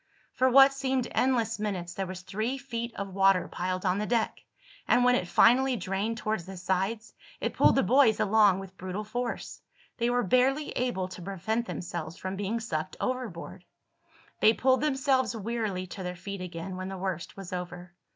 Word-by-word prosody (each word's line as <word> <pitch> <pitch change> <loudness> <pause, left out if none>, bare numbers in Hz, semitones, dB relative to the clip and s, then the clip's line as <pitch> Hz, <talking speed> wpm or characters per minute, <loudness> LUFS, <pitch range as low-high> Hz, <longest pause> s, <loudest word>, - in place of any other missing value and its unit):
For 260 0 +3
what 270 +2 +7
seemed 265 -2 -1
endless 230 -4 +1
minutes 185 -5 -3
there 190 +1 -3
was 185 0 -7
three 220 +8 -2
feet 235 -3 -5
of 200 -1 -5
water 195 -1 +4
piled 185 +1 -3
on 185 +1 +2
the 210 - -2
deck, 230 -2 0 0.4
and 245 - +4
when 250 0 +5
it 185 -7 0
finally 250 +8 +5
drained 210 +2 -2
toward 215 -2 -1
the 190 +3 -9
sides 190 +5 -2 0.3
it - - -2
pulled - - +5
the 270 - +3
boys 235 +1 +4
along 205 -2 +4
with 190 -1 -9
brutal 185 +3 -4
force. 240 +3 -4 0.4
They 235 +1 +2
were 245 0 +2
barely 265 +7 +2
able 240 -7 -1
to 185 -1 -9
prevent 210 +6 -2
themselves 170 -1 -5
from 185 +1 -4
being 205 +4 -2
sucked 175 -6 -4
overboard. 250 -10 -4 0.8
They 220 - +6
pulled 260 +2 +2
themselves 265 -5 +1
wearily 215 -4 -2
to 185 +2 -8
their 180 -1 -4
feet 195 +2 -7
again 180 +1 -6
when 185 0 -5
the 195 - -5
worst 185 -2 -4
was 190 -2 -8
over. 180 0 -6
205 Hz, 180 wpm, -28 LUFS, 185-245 Hz, 0.8 s, what